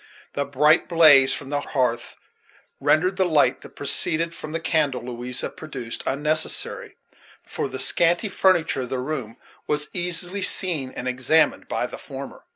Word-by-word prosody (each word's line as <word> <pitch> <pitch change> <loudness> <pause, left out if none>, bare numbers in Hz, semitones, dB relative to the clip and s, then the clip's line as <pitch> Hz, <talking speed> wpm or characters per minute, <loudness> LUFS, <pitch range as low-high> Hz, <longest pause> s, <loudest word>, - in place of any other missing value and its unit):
The 140 - -1
bright 150 +5 +3
blaze 155 -6 +7
from 140 -1 -4
the 145 - 0
hearth 125 -5 -2 0.6
rendered 185 +4 +2
the 190 - +3
light 155 -4 +2
that - - -14
proceeded 165 +1 -1
from 155 - -8
the 165 - -2
candle 155 -6 0
Louisa 125 0 -4
produced 130 -7 -7
unnecessary; 150 +3 -1 0.5
for - - -4
the - - -6
scanty 170 +5 +2
furniture 185 -7 +2
of 125 - -5
the 130 - -2
room 130 -4 -4 0.3
was 150 0 -1
easily 180 +2 -2
seen 175 -7 0
and 125 - -5
examined 130 +5 +2
by - - -1
the - - -8
former. - - -9
150 Hz, 155 wpm, -23 LUFS, 130-170 Hz, 0.6 s, blaze